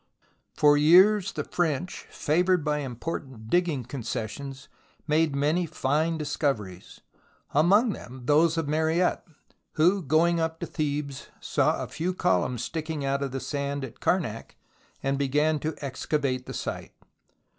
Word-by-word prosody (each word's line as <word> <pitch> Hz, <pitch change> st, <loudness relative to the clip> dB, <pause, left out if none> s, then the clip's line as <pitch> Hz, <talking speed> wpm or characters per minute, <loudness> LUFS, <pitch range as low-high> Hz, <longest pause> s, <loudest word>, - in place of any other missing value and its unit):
For 145 Hz, -1 st, +5 dB
years 185 Hz, +6 st, +5 dB
the -, -, -3 dB
French, 175 Hz, 0 st, -2 dB
favoured 175 Hz, +1 st, +1 dB
by 150 Hz, 0 st, +1 dB
important 130 Hz, -3 st, -6 dB
digging 175 Hz, -7 st, +1 dB
concessions, 130 Hz, +2 st, -5 dB, 0.4 s
made 155 Hz, -1 st, +2 dB
many 155 Hz, +5 st, +1 dB
fine 160 Hz, +2 st, 0 dB
discoveries, 135 Hz, -, -3 dB, 0.5 s
among 200 Hz, -, +4 dB
them 125 Hz, +1 st, -10 dB
those 155 Hz, +4 st, +4 dB
of 160 Hz, -3 st, -1 dB
Mariette 160 Hz, +4 st, +1 dB, 0.5 s
who, 180 Hz, +5 st, +3 dB
going 165 Hz, +3 st, +2 dB
up 160 Hz, 0 st, -2 dB
to -, -, -1 dB
Thebes, 145 Hz, -3 st, -3 dB
saw -, -, +1 dB
a -, -, -5 dB
few 180 Hz, +3 st, -3 dB
columns 110 Hz, -, +1 dB
sticking 155 Hz, -3 st, -4 dB
out 140 Hz, 0 st, 0 dB
of 140 Hz, -, -1 dB
the 135 Hz, +1 st, -4 dB
sand 140 Hz, 0 st, -3 dB
at 120 Hz, -1 st, -13 dB
Karnak 135 Hz, -, -1 dB, 0.5 s
and 135 Hz, 0 st, 0 dB
began 150 Hz, +3 st, +2 dB
to 155 Hz, +2 st, -3 dB
excavate 130 Hz, -1 st, -2 dB
the -, -, -6 dB
site. -, -, -5 dB
150 Hz, 135 wpm, -27 LUFS, 135-165 Hz, 0.5 s, For